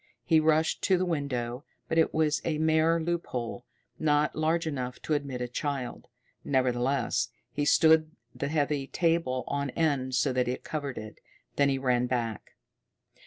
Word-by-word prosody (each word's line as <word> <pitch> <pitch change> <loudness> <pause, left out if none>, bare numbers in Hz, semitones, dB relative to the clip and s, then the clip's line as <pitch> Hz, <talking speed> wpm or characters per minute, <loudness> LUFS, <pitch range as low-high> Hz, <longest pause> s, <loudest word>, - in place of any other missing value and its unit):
He 160 -2 +4
rushed 155 0 +2
to 190 - +4
the 185 - 0
window, 135 -6 -2 0.2
but 165 - +1
it 160 - +3
was 155 -1 +1
a 155 -2 -1
mere 160 +1 +3
loophole, 130 -8 -3 0.3
not 150 -1 +2
large 160 +2 +1
enough 125 -5 -4
to 155 - -1
admit 140 -4 -2
a 125 - -1
child. 130 0 -4 0.4
Nevertheless, 130 -1 +1 0.2
he 145 +3 -1
stood 160 +1 +5 0.2
the 140 - -3
heavy 145 -2 0
table 165 -7 0
on 140 -1 -2
end 135 -4 0
so 130 +1 +2
that 125 -1 +1
it 125 - -3
covered 145 -4 -4
it. 110 0 -8 0.4
Then 140 -1 +3
he 135 - +1
ran 125 -2 +1
back. 115 -4 -3
140 Hz, 160 wpm, -28 LUFS, 125-160 Hz, 0.4 s, stood